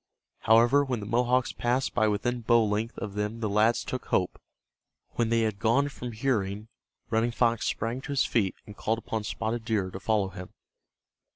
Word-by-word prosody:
However, 120 Hz, +6 st, +5 dB
when 130 Hz, -4 st, -2 dB
the 100 Hz, -, -6 dB
Mohawks 125 Hz, +3 st, +1 dB
passed 125 Hz, +2 st, 0 dB
by 110 Hz, -, +3 dB
within 120 Hz, +4 st, -1 dB
bow 115 Hz, 0 st, +4 dB
length 105 Hz, +2 st, -2 dB
of 100 Hz, -1 st, -5 dB
them 105 Hz, +2 st, -3 dB
the 110 Hz, -, -1 dB
lads 110 Hz, +3 st, +2 dB
took 130 Hz, -, -5 dB
hope. 90 Hz, -, 0 dB, 0.7 s
When 115 Hz, -1 st, 0 dB
they 115 Hz, 0 st, +2 dB
had 110 Hz, -3 st, -1 dB
gone 125 Hz, +6 st, +2 dB
from 125 Hz, -3 st, -7 dB
hearing, 110 Hz, -3 st, -1 dB, 0.4 s
Running 115 Hz, +1 st, +2 dB
Fox 115 Hz, -1 st, +1 dB
sprang 115 Hz, +4 st, -2 dB
to 145 Hz, -, -7 dB
his 140 Hz, -, +2 dB
feet 100 Hz, -5 st, 0 dB
and 105 Hz, -, -11 dB
called 110 Hz, +2 st, -1 dB
upon 110 Hz, -1 st, -4 dB
Spotted 115 Hz, +2 st, -3 dB
Deer 105 Hz, -5 st, -1 dB
to 95 Hz, -, -7 dB
follow 105 Hz, -2 st, +1 dB
him. 90 Hz, -1 st, -9 dB
115 Hz, 185 wpm, -28 LUFS, 105-120 Hz, 0.7 s, However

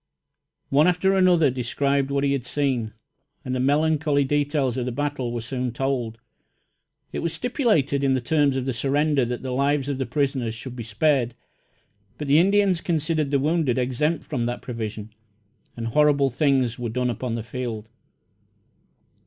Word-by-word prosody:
One 145 Hz, +4 st, +4 dB
after 180 Hz, +2 st, +2 dB
another 180 Hz, -6 st, +4 dB
described 135 Hz, +2 st, 0 dB
what 140 Hz, 0 st, 0 dB
he 140 Hz, -, +2 dB
had 140 Hz, -3 st, -1 dB
seen, 125 Hz, -4 st, -1 dB, 0.5 s
and 130 Hz, -, -2 dB
the 130 Hz, -, -1 dB
melancholy 145 Hz, +1 st, +2 dB
details 145 Hz, -2 st, 0 dB
of 125 Hz, -1 st, -2 dB
the -, -, -1 dB
battle 145 Hz, -2 st, -2 dB
were 120 Hz, -1 st, -3 dB
soon 125 Hz, 0 st, -3 dB
told. 120 Hz, -3 st, -2 dB, 0.9 s
It -, -, -3 dB
was 170 Hz, -1 st, -2 dB
stipulated 210 Hz, -, +1 dB
in 135 Hz, -1 st, +3 dB
the -, -, +1 dB
terms 145 Hz, +1 st, +2 dB
of 130 Hz, -1 st, -2 dB
the 135 Hz, -, -1 dB
surrender 140 Hz, +2 st, +1 dB
that 120 Hz, +1 st, -4 dB
the 130 Hz, -, -3 dB
lives 140 Hz, +2 st, +1 dB
of 140 Hz, -2 st, -2 dB
the 135 Hz, -, -2 dB
prisoners 130 Hz, -3 st, -1 dB
should 125 Hz, +2 st, -8 dB
be 120 Hz, -, -6 dB
spared; 120 Hz, +2 st, +1 dB, 0.8 s
but 150 Hz, -, -5 dB
the 145 Hz, +3 st, +5 dB
Indians 195 Hz, -1 st, +3 dB
considered 155 Hz, -3 st, 0 dB
the 140 Hz, -, +2 dB
wounded 150 Hz, -3 st, +1 dB
exempt 130 Hz, +6 st, 0 dB
from 120 Hz, -6 st, -2 dB
that 120 Hz, -, -4 dB
provision, 110 Hz, -3 st, -6 dB, 0.6 s
and 115 Hz, -, -4 dB
horrible 140 Hz, 0 st, +3 dB
things 130 Hz, -3 st, +1 dB
were 120 Hz, -1 st, -3 dB
done 125 Hz, +2 st, -1 dB
upon 120 Hz, 0 st, -3 dB
the 115 Hz, -, -4 dB
field. 115 Hz, -2 st, -5 dB
135 Hz, 170 wpm, -24 LUFS, 125-150 Hz, 0.9 s, the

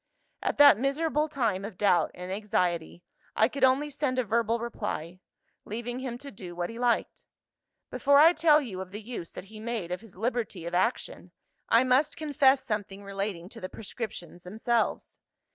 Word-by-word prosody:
"At -, -, -1 dB
that 285 Hz, -7 st, +8 dB
miserable 300 Hz, +3 st, +1 dB
time 230 Hz, -10 st, -1 dB
of 205 Hz, -2 st, -7 dB
doubt 200 Hz, -3 st, +3 dB
and 180 Hz, +1 st, -7 dB
anxiety, 180 Hz, -4 st, -1 dB, 0.3 s
I -, -, +5 dB
could 280 Hz, -, -5 dB
only 270 Hz, +3 st, +3 dB
send 275 Hz, -2 st, -1 dB
a 255 Hz, -, +2 dB
verbal 230 Hz, +1 st, +1 dB
reply, 205 Hz, -7 st, -5 dB, 0.4 s
leaving 240 Hz, +3 st, -5 dB
him 255 Hz, -2 st, -4 dB
to 280 Hz, +2 st, -9 dB
do 180 Hz, -3 st, -9 dB
what 175 Hz, +4 st, -3 dB
he 230 Hz, -, -9 dB
liked. 245 Hz, -1 st, 0 dB, 0.6 s
Before 280 Hz, 0 st, +4 dB
I 320 Hz, +4 st, +8 dB
tell 310 Hz, -2 st, +5 dB
you 190 Hz, -7 st, -6 dB
of 190 Hz, -, -7 dB
the 205 Hz, +3 st, -7 dB
use 220 Hz, -7 st, -6 dB
that -, -, -8 dB
he 215 Hz, -, -9 dB
made 220 Hz, -6 st, -4 dB
of 180 Hz, -, -3 dB
his 220 Hz, -6 st, -15 dB
liberty 220 Hz, -5 st, -2 dB
of 170 Hz, -, -5 dB
action, 185 Hz, +7 st, -1 dB, 0.4 s
I 230 Hz, +2 st, +6 dB
must 260 Hz, +4 st, +2 dB
confess 280 Hz, -3 st, +3 dB
something 205 Hz, -3 st, -4 dB
relating 195 Hz, -3 st, -4 dB
to -, -, -11 dB
the 185 Hz, -, -5 dB
prescriptions 205 Hz, -5 st, -7 dB
themselves. 225 Hz, +5 st, -1 dB
225 Hz, 180 wpm, -28 LUFS, 190-260 Hz, 0.6 s, that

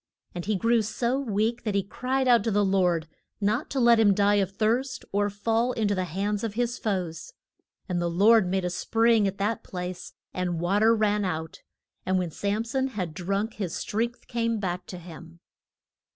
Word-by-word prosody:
And 175 Hz, -1 st, -5 dB
he 215 Hz, +1 st, 0 dB
grew 230 Hz, +4 st, +2 dB
so 235 Hz, +4 st, -1 dB
weak 230 Hz, -1 st, -1 dB
that 210 Hz, -3 st, -2 dB
he 200 Hz, -, +2 dB
cried 255 Hz, +6 st, -1 dB
out 240 Hz, -2 st, +5 dB
to -, -, +2 dB
the 205 Hz, -1 st, +2 dB
Lord 180 Hz, -4 st, +1 dB, 0.3 s
not 215 Hz, +7 st, 0 dB
to 275 Hz, -, -2 dB
let 235 Hz, -2 st, +5 dB
him 205 Hz, -3 st, +5 dB
die 205 Hz, +1 st, +3 dB
of 190 Hz, -, -1 dB
thirst 240 Hz, +6 st, -1 dB
or 205 Hz, +1 st, +1 dB
fall 225 Hz, +4 st, 0 dB
in 220 Hz, -3 st, 0 dB
to -, -, +2 dB
the 185 Hz, -2 st, -1 dB
hands 200 Hz, +5 st, -2 dB
of 215 Hz, -2 st, -3 dB
his 240 Hz, 0 st, -1 dB
foes. 185 Hz, -, -3 dB, 0.5 s
And 180 Hz, -2 st, -1 dB
the 170 Hz, -, 0 dB
Lord 205 Hz, +4 st, +5 dB
made 190 Hz, 0 st, 0 dB
a 180 Hz, -, -1 dB
spring 225 Hz, +3 st, +2 dB
at 195 Hz, 0 st, -4 dB
that 210 Hz, +3 st, -1 dB
place 180 Hz, -1 st, -6 dB, 0.2 s
and 180 Hz, -2 st, -2 dB
wa 180 Hz, +4 st, +1 dB
ter 225 Hz, +2 st, +5 dB
ran 210 Hz, -1 st, +1 dB
out, 160 Hz, -2 st, -4 dB, 0.4 s
and 185 Hz, 0 st, +1 dB
when 180 Hz, -3 st, -1 dB
Sam 205 Hz, +6 st, -1 dB
son 265 Hz, +3 st, -1 dB
had 185 Hz, -10 st, -4 dB
drunk, 195 Hz, +5 st, -2 dB
his 190 Hz, -6 st, -3 dB
strength 235 Hz, +3 st, -3 dB
came 230 Hz, -1 st, -1 dB
back 180 Hz, -2 st, -3 dB
to 180 Hz, -, -7 dB
him. 170 Hz, -1 st, -12 dB
205 Hz, 200 wpm, -26 LUFS, 185-230 Hz, 0.5 s, out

